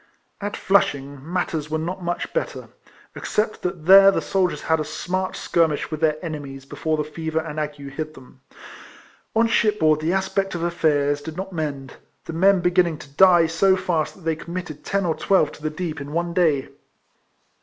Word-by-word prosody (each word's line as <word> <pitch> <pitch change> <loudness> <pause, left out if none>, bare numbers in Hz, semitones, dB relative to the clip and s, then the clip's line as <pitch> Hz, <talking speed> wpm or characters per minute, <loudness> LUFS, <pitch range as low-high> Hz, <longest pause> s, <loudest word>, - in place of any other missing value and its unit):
At 205 +1 -3
Flushing 145 -6 0
matters 165 -4 -2
were 160 - -1
not 175 +4 -4
much 175 0 -3
better, - - -3 0.5
except 215 0 -2
that 175 -3 -4
there 195 +2 +9
the 195 - +1
soldiers 185 -2 -1
had 160 0 +2
a - - 0
smart 185 +5 -3
skirmish 160 -3 0
with 155 - -3
their 155 -1 +2
enemies 140 -4 -6
before 150 +3 -2
the 150 - 0
fever 160 +1 -5
and 160 -1 -2
ague 150 -1 -4
attacked 155 +2 -6
them. 130 0 -16 0.9
On 225 +1 +4
shipboard 210 -9 +2
the 160 +2 0
aspect 190 0 -1
of 170 - -3
affairs 145 -4 +1
did 160 +2 -8
not 190 0 -5
mend; 145 -5 -4 0.3
the - - -6
men 190 +3 +4
beginning 175 -2 +2
to 145 - -12
die 175 0 +6
so 175 +4 +3
fast 170 -4 -1
that - - -17
they 165 -1 -1
committed 170 -1 -7
ten 200 -1 -1
or 165 - +1
twelve 170 -3 +2
to - - -14
the 155 - -1
deep 155 -1 -5
in 145 +1 -7
one 170 +1 -1
day. 155 -7 +2
165 Hz, 185 wpm, -23 LUFS, 150-185 Hz, 0.9 s, there